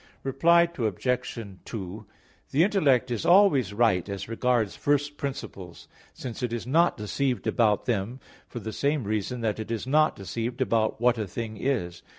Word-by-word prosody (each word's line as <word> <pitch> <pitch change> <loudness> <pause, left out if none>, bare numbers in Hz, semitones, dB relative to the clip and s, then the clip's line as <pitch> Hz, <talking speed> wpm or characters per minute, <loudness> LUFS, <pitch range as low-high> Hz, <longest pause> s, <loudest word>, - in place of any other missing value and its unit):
Reply 170 +6 +4
Obj. 125 +4 -1 0.3
2: 105 -1 -7 0.4
The 145 +4 +3
intellect 140 - +2
is 115 - -2
always 170 - +5
right 100 -4 +2
as 100 0 -5
regards 115 -2 0
first 145 0 0
principles; 100 - -7 0.2
since 120 -3 -7
it 125 -2 -1
is 120 -1 -3
not 165 +7 +3
deceived 125 +5 -2
about 105 -4 +2
them 115 +2 -2 0.3
for 120 - -7
the 110 -1 -6
same 145 -1 0
reason 110 +4 -2
that 110 -2 -1
it 110 - -5
is 115 0 -3
not 155 +4 +3
deceived 115 +6 -4
about 115 -4 +1
what 120 0 +3
a 105 - -2
thing 110 +3 -5
is. 105 -8 -2
120 Hz, 160 wpm, -26 LUFS, 105-135 Hz, 0.4 s, always